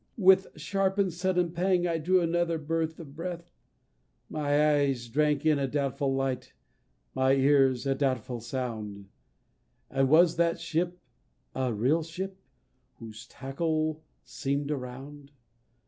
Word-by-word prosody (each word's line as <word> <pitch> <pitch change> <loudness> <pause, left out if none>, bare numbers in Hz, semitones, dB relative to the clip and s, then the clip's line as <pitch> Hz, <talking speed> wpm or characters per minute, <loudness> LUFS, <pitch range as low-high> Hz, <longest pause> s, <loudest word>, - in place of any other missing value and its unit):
With 190 -2 +5
sharp 195 +4 0
and 195 -4 +1
sudden 180 0 0
pang 180 +1 +1
I 165 -2 0
drew 180 +3 +3
another 170 0 +1
birth 160 +1 -2
of 145 -4 -10
breath; 170 +1 -6 0.8
My 150 0 +2
eyes 135 -4 0
drank 150 +4 +1
in 155 -2 +4
a 135 - 0
doubtful 140 0 -1
light, 130 -1 -2 0.6
my 130 0 +3
ears 135 -2 +3
a 135 - +2
doubtful 130 -3 -1
sound 110 -5 -5 0.8
And 135 0 +2
was 165 +2 +5
that 170 0 +2
ship 175 +2 -2 0.6
a 130 -2 -1
real 125 +10 +2
ship 190 +4 -6 0.6
whose 110 -1 -11
tackle 155 +3 -2 0.2
seem'd 140 +1 -3
around? 140 +2 -7
150 Hz, 130 wpm, -28 LUFS, 135-170 Hz, 0.8 s, With